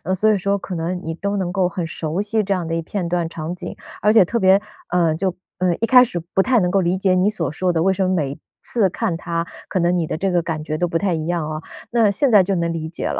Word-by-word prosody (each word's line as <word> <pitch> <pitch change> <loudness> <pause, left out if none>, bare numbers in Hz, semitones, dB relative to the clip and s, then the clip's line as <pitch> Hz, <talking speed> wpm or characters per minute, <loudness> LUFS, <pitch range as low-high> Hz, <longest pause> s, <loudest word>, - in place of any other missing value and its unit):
所 215 +3 +3
以 205 - +1
说 200 +2 0
可 190 -1 -7
能 175 +2 -2
你 165 - -3
都 200 +4 -2
能 180 -2 -2
够 185 -2 +2
很 180 -2 -3
熟 160 +2 -3
悉 215 +1 0
这 200 - -4
样 175 -3 -2
的 165 0 -1
片 180 +1 -3
段 170 -1 0
场 165 +1 -5
景， 175 -1 -7 0.3
而 210 +2 +4
且 220 -4 +6
特 235 +6 -1
别 190 0 +5 0.3
呃， 170 -3 +2
就 180 +1 -1 0.2
呃， 180 -2 +2
一 - - +3
开 250 +1 +7
始 180 -8 -2
不 190 - +4
太 250 +1 +3
能 180 -2 +1
够 195 0 +3
理 175 +2 +1
解 190 -1 +2
你 185 +3 +3
所 165 -10 -3
说 180 +3 0
的， 165 -1 +1
为 190 +1 +3
什 190 0 0
么 185 - +1
每 145 -5 -1 0.2
次 215 -6 +1
看 180 -3 -2
它 170 0 -3 0.2
可 - - -3
能 175 +1 +2
你 170 -3 0
的 - - -3
这 190 +1 0
个 175 -1 +2
感 160 -2 -4
觉 155 0 -3
都 175 +2 0
不 165 - 0
太 190 0 0
一 160 -1 -2
样 170 -2 -1
啊， 155 0 -4 0.3
那 230 -3 +4
现 265 +5 +1
在 205 -3 +7
就 195 +1 -1
能 170 -1 0
理 160 -1 -4
解 165 - -4
了， - - -2
180 Hz, 310 characters per minute, -20 LUFS, 165-200 Hz, 0.3 s, 开